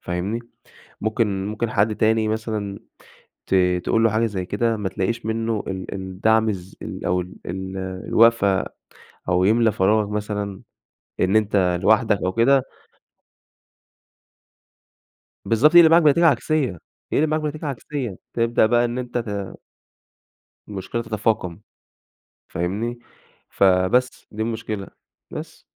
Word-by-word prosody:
فاهمني؟ 90 +6 -3 0.6
ممكن 105 -3 -1
ممكن 110 +2 -3
حد 105 +1 +1
تاني 110 0 +2
مثلًا 110 -2 -3 0.7
ت - - +1 0.3
تقول 115 0 +2
له 115 - +5
حاجة 110 +2 +1
زي 95 -5 -3
كده 115 +4 0
ما 100 -3 -2
تلاقيش 115 +6 -2
منه 110 -1 -1
ال 95 -1 -5
الدعم 100 +4 +1
الز 95 -2 -6
ال - - -6
أو 90 +1 +1
ال 90 +1 -10
ال 95 +2 -5 0.3
الوقفة، 110 -4 +4 0.6
أو 90 0 +2
يملى 110 +3 +4
فراغك 105 +2 +2
مثلًا 105 -2 -4 0.6
إن 95 +3 +2
أنت 100 -5 +2
لوحدك 110 0 +3
أو 95 - 0
كده 130 +4 +3 2.8
بالضبط 135 +9 +3
يقلب 170 -2 +9
معاك 170 +1 +6
بنتيجة 160 +3 +5
عكسية، 140 - +1 0.3
يقلب 155 +2 +2
معاك 155 +1 0
بنتيجة 155 0 -4
عكسية، 135 -5 -4 0.2
تبدأ 115 -1 +2
بقى 120 +2 +3
إن 120 +1 -2
أنت 125 -1 -3
ت 100 -4 -4 1.1
المشكلة 105 +3 -4
تتفاقم، 105 -5 -1 0.9
فاهمني؟ 105 +8 -3 0.5
فبس 95 +7 +2
دي 110 +1 -4
المشكلة، 110 -3 -4 0.4
بس. - - -8
110 Hz, 125 wpm, -22 LUFS, 95-115 Hz, 2.8 s, يقلب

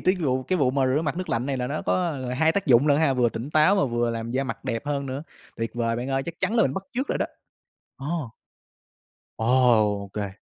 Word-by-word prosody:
tiết 185 0 +2
gụ 130 -5 0
cái 185 +6 -1
vụ 130 -4 +3
mà 135 -1 +1
rửa 135 +5 +1
mặt 150 +1 -2
nước 185 0 -4
lạnh 120 +3 -1
này 135 -1 -1
là 125 - -2
nó 145 +4 -3
có, - - +1 0.2
ờ, 130 -3 -5
hai 160 +5 +3
tác 200 0 -1
dụng 130 +1 +5
lận 145 0 +4
ha, 155 -4 +3
vừa 120 -2 +3
tỉnh 115 +5 -6
táo 155 +6 +5
mà 195 - +3
vừa 120 -1 0
làm 115 0 -4
da 130 +3 0
mặt 115 -3 -6
đẹp 115 +5 -3
hơn 140 -1 -1
nữa. 135 +2 -4 0.3
Tuyệt 115 0 -2
vời 115 -1 0
bạn 125 +2 -4
ơi, 135 0 0
chắc 170 +3 -6
chắn 185 +5 0
là 225 - +5
mình - - +1
bắt 195 - -3
chước 265 +4 -2
rồi - - -1
đó. - - 0 0.7
Ồ. 145 -2 -3 1.1
Ồ, 115 +1 -1 0.6
ô - - -11
kê. 100 -1 -4
135 Hz, 265 wpm, -25 LUFS, 120-155 Hz, 1.1 s, dụng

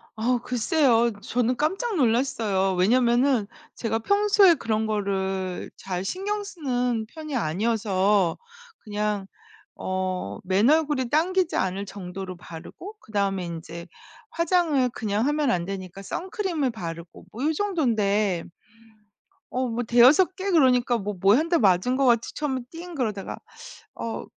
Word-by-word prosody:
어 240 +3 +1
글쎄요. 240 -1 +2
저는 245 +2 0
깜짝 390 +9 -1
놀랐어요. 225 - +1
왜냐면은 240 +4 +3 0.3
제가 225 -1 -2
평소에 405 - +4
그런 220 -6 -1
거를 195 -3 -2
잘 185 0 -5
신경 410 - -2
쓰는 250 - -2
편이 305 +2 -7
아니어서 200 -1 +1 0.5
그냥 210 -2 -2 0.5
어 185 - -3
맨얼굴이 260 - +2
당기지 355 +3 +1
않을 190 +2 -1
정도로 190 -1 -7
바르고 175 - -10
그다음에 200 -3 -1
인제 170 0 -7 0.4
화장을 335 - +2
그냥 215 +1 -1
하면 295 -2 +1
안 175 -1 0
되니까 190 -1 -6
선크림을 350 - -2
바르고 170 -5 -8
뭐 245 +5 -5
요 315 - +2
정돈데 215 - 0 1.1
어 255 0 0
뭐 235 +1 -2
5-6 260 +11 +5
개 390 +1 -3
그러니까 250 -7 +3
뭐 205 -1 -4
뭐 195 +2 +6
1 315 - 0
대 340 0 +2
맞은 200 +4 +3
것 270 0 +2
같이 235 -2 +2
처음에 265 -4 -2
띵 340 +1 -9
그러다가 215 -7 -3 0.6
어 230 - -4
235 Hz, 265 characters per minute, -25 LUFS, 195-295 Hz, 1.1 s, 뭐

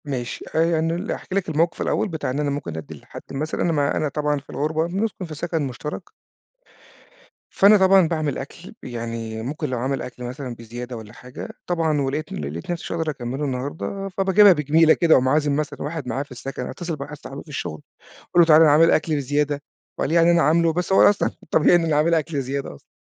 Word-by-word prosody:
ماشي. 125 -4 -4
آآ 165 0 +2
أنا 165 +1 0
ل 175 - -3
أحكي 185 - -5
لك 195 -3 0
الموقف 160 +2 0
الأول - - 0
بتاع 160 -7 -4
إن 130 +3 -2
أنا 145 -1 0
ممكن 140 - -4
أدّي 80 -3 -7
لحد - - -11
مثلًا 150 +3 -3
أنا 170 - +2
ما 145 -3 +1
أنا 155 - 0
طبعًا 150 0 -1
في 140 - -24
الغُربة 155 +2 -1
بنسكُن 195 +1 -3
في 160 -2 -8
سَكَن 165 +1 -2
مُشترَك. 150 +7 -7 1.4
فأنا 205 +2 +6
طبعًا 190 -2 +5
باعمل 155 -3 -1
أكل، 165 +6 -9
يعني 115 -2 -5
ممكن 135 +6 -4
لو 125 - -2
عامل 130 +2 -2
أكل 125 0 -8
مثلًا 125 0 -6
بزيادة 120 +2 -8
والّا 110 -1 -11
حاجة، 125 +1 -9 0.2
طبعًا 160 -4 +1
ولقيت 145 +3 -3
ل - - -4
لقيت 85 - -5
نفسي 175 - -4
مش - - -7
هاقدر 165 -1 -1
أكمّله 130 +1 -5
النهارده، 145 +9 -4
فباجيبها 195 +1 +6
بجميلة 155 +1 +4
كده 165 -2 +3
وأقوم 130 0 +3
عازم 145 0 +2
مثلًا 150 0 -3
واحد 150 -2 -4
معايا 135 +2 -2
في 145 - -22
السَكَن، 135 +2 -6
أتّصل 175 -3 -5
بواحد 145 +1 -8
صاحبي 140 0 -9
في - - -30
الشغل 85 - -5 0.5
أقول 175 - +6
له: - - +6
"تعالَ 155 -1 +7
أنا 155 -2 +7
عامل 165 +3 +6
أكل 155 0 +1
بزيادة،" 145 +1 -1 0.4
وقال - - -1
يعني 170 +1 +5
أنا 170 0 +4
عامل 160 +3 +3
له، 165 -1 +2
بس 180 +3 -1
هو - - +7
أصلًا 205 - 0 0.2
طبيعي 160 - +5
إن 170 -1 +2
أنا 160 -2 +1
عامل 155 +3 +3
أكل 155 -3 0
زيادة 135 - -4
أصلًا. - - -21
150 Hz, 220 wpm, -22 LUFS, 135-165 Hz, 1.4 s, تعالَ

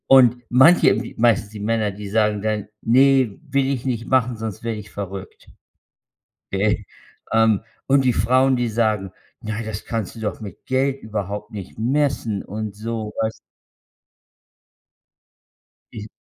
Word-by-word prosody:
Und 125 -2 +6
manche, 130 +8 +6
m 110 +4 -1
meistens 110 -3 +3
die 110 - -9
Männer, 110 0 0
die 100 0 -8
sagen 105 -1 +1
dann: 105 -1 -2
„Ne, 130 -2 +4
will 140 -1 +1
ich 135 -3 -2
nicht 120 -3 -2
machen, 125 -2 +2
sonst 110 -3 -6
werde 115 -2 -3
ich 105 -1 -11
verrückt.“ 95 -1 -7 1.0
Äh, 105 +2 +1 0.5
ähm, 110 -2 +4 0.3
und 135 0 +4
die 125 - +4
Frauen, 130 +6 +3
die 120 -1 0
sagen: 110 -4 0 0.3
„Na, 110 +1 -4
das 110 -1 -6
kannst 115 -3 -3
du - - -9
doch 110 -1 -3
mit 100 -5 -10
Geld 135 +1 0
überhaupt 105 0 -4
nicht 100 -4 -8
messen“ 120 -3 0
und 105 0 -5
so, 110 0 -4
weißt 110 0 -2 2.6
Is 105 0 -7
110 Hz, 145 wpm, -22 LUFS, 105-125 Hz, 2.6 s, Und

